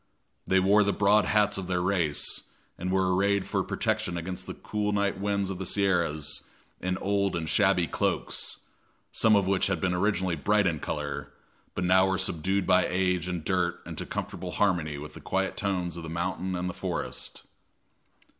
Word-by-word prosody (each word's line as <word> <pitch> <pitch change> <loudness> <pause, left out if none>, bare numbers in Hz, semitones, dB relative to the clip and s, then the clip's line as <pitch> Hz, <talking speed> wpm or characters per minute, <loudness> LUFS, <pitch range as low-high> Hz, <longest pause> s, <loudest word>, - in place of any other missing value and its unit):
They 95 - +4
wore 100 +3 +5
the 100 0 +1
broad 105 +1 +4
hats 105 -1 +2
of 95 - -5
their 90 -1 0
race, 90 -5 0 0.3
and 90 +1 -3
were 95 -1 +2
arrayed 100 +1 +2
for - - 0
protection 90 -1 -1
against 90 +2 -5
the - - -5
cool 105 -1 -2
night 100 -1 0
winds 100 -1 0
of 95 - -5
the 95 - -3
Sierras 80 -7 +1 0.4
in 90 0 -1
old 100 0 0
and 80 -2 -2
shabby 75 - +3
cloaks, - - -2 0.5
some 110 -1 +4
of 100 -2 +3
which 95 0 +2
had 95 -4 0
been 90 0 0
originally 95 -1 +1
bright 100 +7 +2
in 80 -4 +1
color, - - -4 0.4
but - - -1
now 95 +1 +5
were 95 - +1
subdued 95 +4 0
by 90 0 +4
age 90 -1 0
and 90 -3 -4
dirt 90 -2 0
into - - -6
comfortable - - -5
harmony 85 -7 +1
with 75 +1 -8
the - - -11
quiet 95 0 -1
tones 90 -4 -2
of - - -5
the 80 - -7
mountain 90 +2 -2
and 90 +1 -2
the 90 - -3
forest. - - -5
95 Hz, 185 wpm, -28 LUFS, 90-100 Hz, 0.5 s, wore